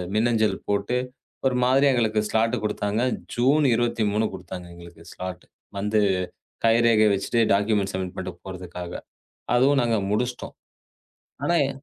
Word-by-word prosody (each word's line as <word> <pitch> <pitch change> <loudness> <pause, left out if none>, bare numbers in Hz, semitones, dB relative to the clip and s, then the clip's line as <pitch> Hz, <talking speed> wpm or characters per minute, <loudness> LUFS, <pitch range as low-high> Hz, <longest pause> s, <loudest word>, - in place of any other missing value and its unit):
மின்னஞ்சல் 110 -1 +2
போட்டு 100 +4 0 0.5
ஒரு 125 -1 0
மாதிரி 135 +3 +4
எங்களுக்கு 110 -3 +1
ஸ்லாட் 115 +2 +2
குடுத்தாங்க. 105 +1 -1 0.3
ஜூன் 140 +5 +3
23 110 -2 +1
குடுத்தாங்க, 90 0 -8
எங்களுக்கு 85 -1 -13
ஸ்லாட் 90 -1 -7 0.3
வந்து 105 +1 +1 0.7
கைரேகை 115 -1 +5
வச்சுட்டு 110 +4 0
டாக்குமெண்ட் 100 -1 +1
சப்மிட் 95 -1 -3
பண்ணிட்டு 85 -2 -6
போறதுக்காக. 90 -1 -7 0.6
அதுவும் 135 +2 +4
நாங்க 115 -2 +1
முடிச்சிட்டோம். 125 +3 -2 0.9
ஆனா 175 - +1
எ - - -3
110 Hz, 120 wpm, -24 LUFS, 95-120 Hz, 0.9 s, கைரேகை